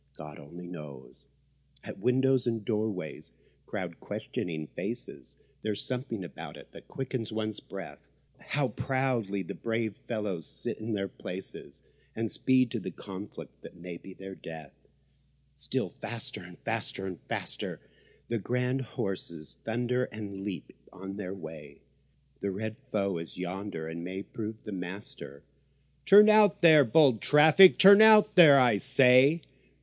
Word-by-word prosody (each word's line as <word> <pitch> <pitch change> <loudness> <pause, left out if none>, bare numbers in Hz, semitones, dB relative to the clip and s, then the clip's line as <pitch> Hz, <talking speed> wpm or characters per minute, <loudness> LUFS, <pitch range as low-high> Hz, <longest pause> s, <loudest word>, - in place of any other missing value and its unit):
God 75 -1 -10
only 85 +5 -11
knows. 75 -7 -11 0.6
At - - -9
windows 130 0 +2
and 115 -3 -2
doorways 105 -7 -3 0.4
crowd - - -5
questioning 80 -3 -5
faces; - - -6 0.2
There's 105 -2 -2
something 125 -5 -4
about 85 - -9
it - - -15
that - - -14
quickens 130 -4 -4
one's 110 -1 -3
breath. - - -9 0.4
How 145 -3 -1
proudly 120 -7 -1
the - - -7
brave 115 -2 -2
fellows 105 -8 -3
sit - - -4
in 110 +1 -4
their 100 -1 -1
places— 95 0 -8 0.3
And 115 0 -2
speed 130 -2 +2
to 115 - -2
the 95 - -5
conflict 95 +2 -10
that - - -12
may 85 0 -8
be 95 +2 -13
their 95 0 -9
death! 80 -6 -10 0.8
Still - - -3
faster - - -5
and - - -12
faster 95 - -3
and 90 -3 -6
faster - - -3
and - - -13
faster - - -31 0.4
The 115 -1 -2
grand 125 +5 -1
horses 90 -9 -6
thunder 120 +2 -1
and 105 -4 -8
leap 100 -3 -6 0.2
on 95 +1 -8
their 95 -2 -5
way 80 -5 -11 0.6
The 100 - -2
red 110 +3 -4 0.2
foe 100 -4 0
is 80 - -9
yonder, 90 -2 -5
and 85 +1 -6
may 95 +2 -5
prove 110 0 -7
the 105 - -7
master; 90 -6 -7 0.6
Turn 210 +2 +9
out 215 -4 +5
there, 155 -3 +8
bold 130 -2 +4
traffic—turn 185 +7 +8
out 215 -1 +7
there, 155 -6 +9
I 120 -5 +4
say! 135 +5 +5
105 Hz, 145 wpm, -29 LUFS, 90-125 Hz, 0.8 s, Turn